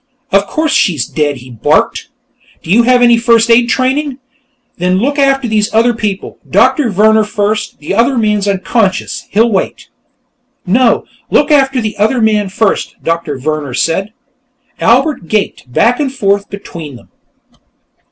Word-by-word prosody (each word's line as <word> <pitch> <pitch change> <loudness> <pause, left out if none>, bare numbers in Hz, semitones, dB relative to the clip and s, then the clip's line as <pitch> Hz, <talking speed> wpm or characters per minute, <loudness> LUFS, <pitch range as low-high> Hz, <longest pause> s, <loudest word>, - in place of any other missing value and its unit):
"Of 200 +1 +2
course 315 -1 -1
she's 155 - +1
dead!" 145 0 -1
he 125 0 -12
barked. 115 - 0 0.5
"You 200 +8 +3
have 245 +1 +3
any 240 -1 +5
first 230 0 +3
aid 235 +1 +4
training? 265 +2 0 0.6
Then 180 +1 +1
look 280 +8 -1
after 270 -2 +2
these 215 0 0
other 235 +2 +3
people. 210 -4 -4
Doctor 295 -7 +2
Vehrner 215 +2 +3
first; 210 0 -2
the 150 - -5
other 240 +5 +2
man's 210 -2 0
unconscious; 195 +1 -1
he'll 225 +3 +2
wait." 190 - -3 0.8
"No; 235 +6 +2 0.2
look 295 +1 +2
after 270 -3 +3
the 215 -2 -3
other 220 +5 +1
man 215 -3 +1
first," 200 +1 -1
Doctor 165 -4 -2
Vehrner 145 -2 -3
said. 190 - -1 0.7
Albert 250 - +1
gaped 195 -11 -2
back 235 - +2
and 280 -3 -1
forth 200 -5 -1
between 170 -8 -9
them. 120 - -16
215 Hz, 145 wpm, -12 LUFS, 190-245 Hz, 0.8 s, any